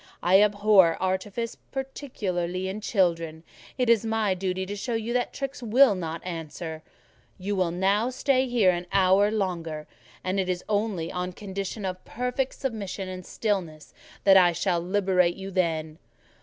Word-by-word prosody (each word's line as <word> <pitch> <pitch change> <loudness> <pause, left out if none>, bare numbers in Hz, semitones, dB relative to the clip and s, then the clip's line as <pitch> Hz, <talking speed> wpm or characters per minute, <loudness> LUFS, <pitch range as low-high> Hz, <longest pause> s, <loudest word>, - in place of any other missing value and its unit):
I 190 +3 +6
abhor 205 -4 +5
artifice, 190 +5 -2 0.2
particularly 190 -10 -3
in 200 +3 -4
children; 165 -6 0 0.3
it 250 - +1
is 230 -2 +4
my 220 -3 +1
duty 185 0 -2
to 200 +2 -5
show 230 +4 -3
you 225 +1 -2
that 245 0 0
tricks 275 -1 -5
will 245 +1 +5
not 165 -3 -5
answer: 165 -2 -6 0.6
you 200 +2 -2
will 185 -3 +1
now 195 +7 +1
stay 260 0 +1
here 230 -7 +4
an 175 0 -4
hour 195 +1 +4
longer, 170 -7 -2 0.4
and 185 +1 -1
it 185 -1 -1
is 180 -1 -2
only 205 -6 -1
on 180 0 -3
condition 195 +1 -5
of 185 -1 -4
perfect 250 +2 -2
submission 200 -7 -4
and 185 -1 -7
stillness 180 -8 -3 0.3
that 195 -1 +7
I 175 -2 +6
shall 175 +1 0
liberate 180 -1 +2
you 195 0 -7
then." 160 -4 -1
190 Hz, 155 wpm, -26 LUFS, 180-215 Hz, 0.6 s, that